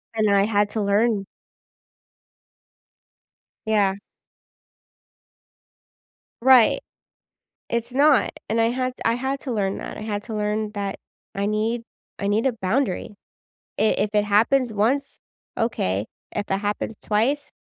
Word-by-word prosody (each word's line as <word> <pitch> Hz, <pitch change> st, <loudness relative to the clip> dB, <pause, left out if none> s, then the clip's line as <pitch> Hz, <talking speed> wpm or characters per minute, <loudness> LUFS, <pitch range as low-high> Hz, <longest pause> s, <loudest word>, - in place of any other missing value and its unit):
and 215 Hz, -1 st, +2 dB
I 200 Hz, 0 st, +4 dB
had 205 Hz, -1 st, +2 dB
to 220 Hz, -, -1 dB
learn 205 Hz, 0 st, +2 dB, 2.4 s
Yeah. 205 Hz, -3 st, +3 dB, 2.5 s
Right. 255 Hz, -2 st, +6 dB, 0.9 s
It's 235 Hz, +1 st, -2 dB
not, 280 Hz, -4 st, +4 dB, 0.2 s
and 225 Hz, +1 st, +1 dB
I 225 Hz, -, +3 dB
had 255 Hz, +1 st, -1 dB
I 230 Hz, -, +4 dB
had 265 Hz, +3 st, -2 dB
to 265 Hz, -, -4 dB
learn 200 Hz, -4 st, -1 dB
that. -, -, -7 dB
I -, -, -7 dB
had 210 Hz, -1 st, -3 dB
to 225 Hz, -, -7 dB
learn 210 Hz, 0 st, -1 dB
that 200 Hz, -1 st, -3 dB, 0.4 s
I 200 Hz, 0 st, -1 dB
need 220 Hz, +3 st, -1 dB, 0.3 s
I 200 Hz, -, -2 dB
need 215 Hz, +5 st, +1 dB
a 255 Hz, -, 0 dB
boundary. 215 Hz, 0 st, -1 dB, 0.7 s
I -, -, +4 dB, 0.2 s
if 210 Hz, -, +1 dB
it 210 Hz, 0 st, +3 dB
happens 225 Hz, +4 st, +3 dB
once, 245 Hz, +7 st, 0 dB, 0.4 s
okay. 105 Hz, -, -1 dB, 0.3 s
If 205 Hz, -, -4 dB
it 195 Hz, -, +2 dB
happens 205 Hz, +2 st, -2 dB
twice 245 Hz, +8 st, 0 dB
215 Hz, 130 wpm, -23 LUFS, 205-240 Hz, 2.5 s, Right